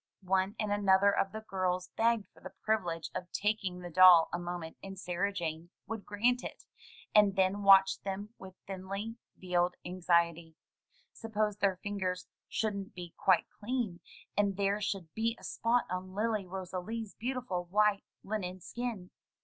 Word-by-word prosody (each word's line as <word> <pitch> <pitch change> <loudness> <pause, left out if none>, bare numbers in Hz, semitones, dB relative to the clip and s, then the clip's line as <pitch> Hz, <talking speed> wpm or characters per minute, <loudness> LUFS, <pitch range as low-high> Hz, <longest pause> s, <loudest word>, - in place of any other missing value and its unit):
One 190 +2 +1
and 215 -2 -1
another 200 -1 +4
of 195 - +1
the 220 - -6
girls 185 -1 -1
begged 230 -2 +2
for - - -19
the - - -10
privilege 175 -7 -1
of 180 -1 -5
taking 205 -3 -1
the 175 -1 -7
doll 180 -1 +8
a 175 - -1
mornent 175 -2 -5
and 195 0 -8
Sarah 180 +2 -1
Jane 170 -3 -4 0.2
would 225 -2 -6
grant 240 +5 +1
it, - - -7 0.5
and 205 -2 +6
then 190 +1 +2
watch 195 -1 +6
them 200 +1 -4
with 190 -1 -10
thinly 195 +4 -5 0.2
veiled 180 -1 +1
anxiety. 170 -2 +1 0.6
Suppose 215 -2 -1
their 200 -3 +2
fingers 185 -3 -2 0.2
shouldn't 200 -4 -2
be 175 -2 -8
quite 185 -3 +3
clean, 220 -6 -2 0.4
and 200 -2 +1
there 200 +1 +1
should 190 -6 -3
be 230 +1 0
a - - -18
spot 240 +2 +1
on 185 +1 -4
Lily 215 -2 0
Rosalie's 190 +4 -5
beautiful 240 -8 -3
white 205 +2 +2 0.2
linen 185 -3 -3
skin! 225 -2 -5
195 Hz, 155 wpm, -32 LUFS, 180-210 Hz, 0.6 s, doll